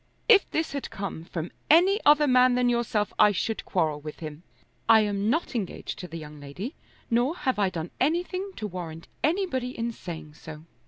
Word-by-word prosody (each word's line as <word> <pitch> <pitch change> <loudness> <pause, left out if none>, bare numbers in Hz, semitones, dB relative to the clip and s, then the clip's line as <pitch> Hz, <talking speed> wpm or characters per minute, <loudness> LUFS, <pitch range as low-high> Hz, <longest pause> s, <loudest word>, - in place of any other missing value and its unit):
"If 430 -5 +6
this 320 0 -1
had 280 -1 -4
come 195 -5 -6
from 170 -1 -5 0.2
any 370 +7 +5
other 295 0 +7
man 255 -2 +5
than 250 0 +3
yourself 230 -3 0
I 210 -1 +7
should 215 +3 -2
quarrel 155 -5 0
with 150 0 -8
him. 155 -1 -7 0.5
I 220 -1 +8
am 205 0 0
not 320 +4 0
engaged 215 -7 -4
to 180 - -6
the 165 - -7
young 150 -1 -9
lady, 160 - -6 0.4
nor 245 +7 +2
have 260 -7 -1
I 195 -2 +3
done 170 -2 -5
anything 360 +6 0
to 215 - -5
warrant 170 -4 -6 0.2
anybody 295 -6 0
in 235 +1 -1
saying 165 -8 -8
so." 155 0 -10
220 Hz, 190 wpm, -27 LUFS, 170-280 Hz, 0.5 s, I